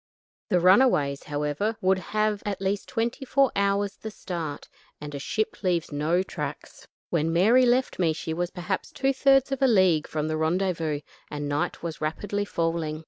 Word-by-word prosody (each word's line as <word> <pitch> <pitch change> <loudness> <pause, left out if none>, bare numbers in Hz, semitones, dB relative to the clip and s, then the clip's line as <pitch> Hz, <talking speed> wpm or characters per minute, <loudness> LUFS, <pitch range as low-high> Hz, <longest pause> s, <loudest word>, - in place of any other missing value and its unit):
The 180 - +3
runaways, 180 - +4
however, 150 +9 -2
would 185 0 +2
have 215 +2 -1
at 205 -2 -3
least 195 +1 -2
twenty 235 +3 -2
four 270 0 +2
hours 200 0 0
the 220 - -7
start, 170 -8 -6 0.3
and 150 0 -8
a 140 - -4
ship 215 +9 -2
leaves 175 -5 0
no 155 +5 +1
tracks. - - -7 0.2
When 165 -1 +1
Mary 225 +9 +5
left 250 -2 +1
me 170 -3 +3
she 160 0 -4
was 175 +1 -2
perhaps 180 +2 -4
two 270 -1 0
thirds 270 0 +3
of 270 0 -2
a 270 - +5
league 185 -9 +3
from 155 0 -2
the 155 0 -1
rendezvous, 160 -2 0 0.3
and 145 -1 -4
night 145 +3 -2
was 165 -2 -5
rapidly 205 +6 -2
falling. 165 -4 -2
185 Hz, 175 wpm, -26 LUFS, 155-215 Hz, 0.3 s, Mary